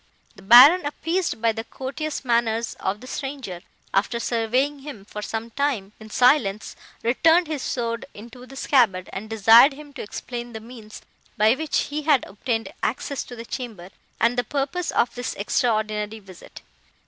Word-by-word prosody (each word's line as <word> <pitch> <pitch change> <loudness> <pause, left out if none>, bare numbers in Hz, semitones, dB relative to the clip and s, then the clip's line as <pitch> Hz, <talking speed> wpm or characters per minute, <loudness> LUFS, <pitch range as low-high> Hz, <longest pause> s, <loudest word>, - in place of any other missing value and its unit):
"The - - -15
Baron, 255 - +8
appeased 330 -4 -2
by 230 - +4
the 225 0 -5
courteous 275 +5 -5
manners 235 -1 0
of 200 +2 -3
the - - -10
stranger, 260 -9 -6 0.3
after 220 +4 +1
surveying 250 +5 0
him, 270 -8 -10
for 210 - -7
some 225 +2 -5
time, 235 -8 -2
in 220 0 -12
silence, 220 -4 +2 0.3
returned 325 +9 +4
his 305 -3 -4
sword 230 -2 -3
into 240 +4 -12
the 270 - -12
scabbard, 230 -10 +2
and 215 +3 -6
desired 225 +5 +6
him 290 0 -13
to - - -7
explain 240 +3 -7
the 220 - -6
means, 220 -1 -12 0.3
by 215 +2 +5
which 310 +3 -2
he 300 +1 -2
had 290 -4 +2
obtained 225 +2 -3
access 265 +4 -2
to 245 - -10
the 230 0 -8
chamber, 220 -9 -7 0.3
and 235 +2 +2
the - - +1
purpose 290 +8 -2
of 235 - +1
this 245 0 -4
extraordinary 215 -1 -1
visit. 195 -4 -14
235 Hz, 165 wpm, -23 LUFS, 220-275 Hz, 0.3 s, Baron